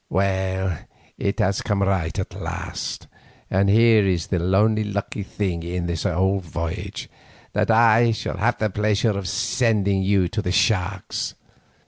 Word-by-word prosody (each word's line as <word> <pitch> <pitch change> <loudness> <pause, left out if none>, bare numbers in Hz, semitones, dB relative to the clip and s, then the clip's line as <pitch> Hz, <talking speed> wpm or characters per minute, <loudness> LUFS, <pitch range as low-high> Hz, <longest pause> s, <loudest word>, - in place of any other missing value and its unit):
Well, 95 -2 0 0.4
it 100 +3 -1
has 100 -1 +1
come 100 -1 0
right 95 -5 0
at - - -3
last, - - -5 0.5
and 100 +1 +3
here 110 0 +5
is 90 -3 0
the 90 -3 -1
only 110 +1 +3
lucky 100 0 -4
thing 95 -3 -3
in 85 +1 -3 0.2
all 95 +3 +1
this 90 -4 -13
voyage, 85 -1 -4 0.5
that - - +1
I 115 +1 +5
shall 110 - -3
have 110 +5 +1
the 110 -1 -1
pleasure 105 +1 +1
of 100 -2 -3
sending 105 -3 +1
you 95 -1 +2
to 105 - -2
the 90 -3 -2
sharks. 95 0 0
100 Hz, 150 wpm, -23 LUFS, 95-110 Hz, 0.5 s, here